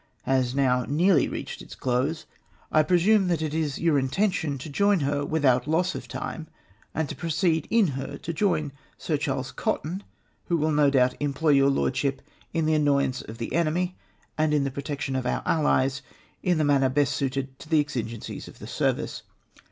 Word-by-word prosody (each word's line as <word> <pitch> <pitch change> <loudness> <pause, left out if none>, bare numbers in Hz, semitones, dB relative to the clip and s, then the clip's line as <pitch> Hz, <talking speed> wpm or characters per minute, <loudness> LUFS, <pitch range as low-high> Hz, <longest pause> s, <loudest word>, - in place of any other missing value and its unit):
has 130 -1 +1
now 125 -2 +2
nearly 170 +5 +4
reached - - -6
its - - -11
close, 130 +5 -1 0.5
I 155 - +5
presume 185 +5 +3
that 170 -3 0
it 155 -1 -2
is 155 -3 -1
your 160 -4 +2
intention 150 +1 0
to 130 - -8
join 200 +5 +2
her 145 +1 0
without 140 -4 +2
loss 165 +4 +1
of - - -7
time, 160 -1 -5 0.5
and 160 -1 0
to - - -6
proceed 165 -1 0
in 220 -6 +4
her 135 +1 -5
to 170 - -5
join 160 -5 0 0.3
Sir 160 - -1
Charles 135 -3 -2
Cotton, 175 +6 -2 0.4
who 170 - +1
will 155 0 +1
no 145 -1 +4
doubt 130 -2 +3
employ 145 +2 0
your 140 -1 +5
Lordship 135 0 0 0.3
in 165 -1 0
the 155 - +2
annoyance 140 -3 +2
of 110 - -9
the 115 - -5
enemy 170 +3 0 0.4
and 155 -1 +3
in 145 - +2
the 135 - -2
protection 140 0 -4
of 130 -1 -1
our - - -1
Allies 135 -4 +2 0.4
in 180 -2 +2
the 155 - +2
manner 140 -2 +3
best 140 +1 +1
suited 135 -1 -3
to - - -12
the 160 -2 +4
exigencies 120 -6 -4
of - - -13
the - - -10
service. - - -1
145 Hz, 185 wpm, -26 LUFS, 135-160 Hz, 0.5 s, I